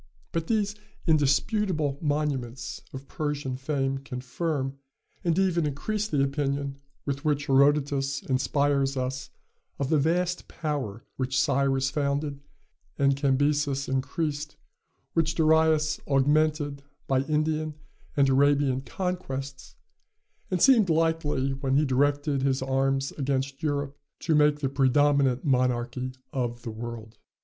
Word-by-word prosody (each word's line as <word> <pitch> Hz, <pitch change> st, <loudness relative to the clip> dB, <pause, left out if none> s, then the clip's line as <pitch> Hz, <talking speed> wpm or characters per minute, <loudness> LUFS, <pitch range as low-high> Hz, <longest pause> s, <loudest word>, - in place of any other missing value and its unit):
But 165 Hz, -1 st, -2 dB
these 210 Hz, -2 st, +1 dB, 0.3 s
indisputable 155 Hz, -, +1 dB
monuments 145 Hz, -5 st, -2 dB
of 135 Hz, -1 st, -9 dB
Persian 145 Hz, -4 st, -3 dB
fame 135 Hz, 0 st, -1 dB
confirm, 135 Hz, +1 st, -3 dB, 0.4 s
and 170 Hz, -2 st, +1 dB
even 175 Hz, -5 st, +2 dB
increase 210 Hz, +9 st, -2 dB
the 145 Hz, -9 st, +1 dB
opinion 140 Hz, 0 st, -1 dB, 0.3 s
with 140 Hz, 0 st, -3 dB
which 145 Hz, -2 st, +1 dB
Herodotus 140 Hz, 0 st, +2 dB
inspires 140 Hz, +1 st, +1 dB
us 130 Hz, 0 st, -3 dB, 0.5 s
of 140 Hz, -1 st, -2 dB
the 155 Hz, -, +3 dB
vast 175 Hz, +4 st, 0 dB
power 140 Hz, -9 st, -4 dB
which 130 Hz, 0 st, 0 dB
Cyrus 135 Hz, -2 st, +2 dB
founded 140 Hz, 0 st, -1 dB, 0.6 s
and 140 Hz, -1 st, +3 dB
Cambyses 140 Hz, 0 st, +1 dB
increased; 145 Hz, +3 st, -2 dB, 0.6 s
which 165 Hz, 0 st, +1 dB
Darius 160 Hz, -1 st, +3 dB
augmented 145 Hz, +1 st, +2 dB, 0.2 s
by 135 Hz, -1 st, +2 dB
Indian 155 Hz, 0 st, 0 dB, 0.4 s
and 140 Hz, -1 st, +5 dB
Arabian 140 Hz, -1 st, +3 dB
conquests, 135 Hz, -7 st, -5 dB, 0.7 s
and 185 Hz, -, 0 dB
seemed 225 Hz, -6 st, +5 dB
likely, 160 Hz, -4 st, +1 dB
when 135 Hz, 0 st, -1 dB
he 150 Hz, -, +3 dB
directed 145 Hz, +1 st, +1 dB
his 135 Hz, -1 st, +1 dB
arms 135 Hz, +1 st, 0 dB
against 135 Hz, +1 st, -1 dB
Europe, 145 Hz, -2 st, -1 dB, 0.3 s
to 165 Hz, -, +1 dB
make 150 Hz, -1 st, +4 dB
the 135 Hz, -, 0 dB
predominant 135 Hz, -1 st, +3 dB
monarchy 125 Hz, -1 st, 0 dB, 0.2 s
of 120 Hz, -2 st, -2 dB
the 115 Hz, -, -4 dB
world. 110 Hz, -1 st, -8 dB
140 Hz, 120 wpm, -27 LUFS, 135-155 Hz, 0.7 s, and